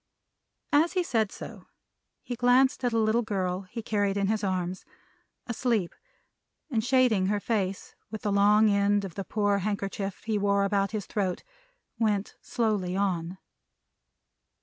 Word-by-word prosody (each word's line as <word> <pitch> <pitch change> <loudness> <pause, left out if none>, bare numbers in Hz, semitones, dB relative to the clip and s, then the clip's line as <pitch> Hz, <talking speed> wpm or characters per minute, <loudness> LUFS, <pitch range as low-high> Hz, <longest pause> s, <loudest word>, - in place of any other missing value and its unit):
As 315 +4 +4
he 365 -2 +1
said 225 - 0
so, - - -10 0.6
he 245 - -4
glanced 255 +3 +3
at 245 - +1
a 230 - 0
little 220 +1 +2
girl 190 -4 -2
he 230 +2 -6
carried 205 -2 0
in 200 - +1
his 220 -1 0
arms, 185 -1 -2 0.6
asleep, 235 -6 -1 0.8
and 225 -3 +1
shading 245 -6 +3
her 205 +1 +1
face 200 -3 -2 0.2
with 220 - -7
the 205 - 0
long 205 +2 +5
end 200 0 +2
of 185 - -7
the 195 - -4
poor 205 0 0
handkerchief 200 -1 -3
he 220 -2 -1
wore 200 0 +2
about 200 0 +1
his 215 -3 -4
throat, 190 -4 -2 0.6
went 210 -3 0
slowly 210 -6 -1
on. 185 -2 -1
205 Hz, 150 wpm, -28 LUFS, 195-225 Hz, 0.8 s, long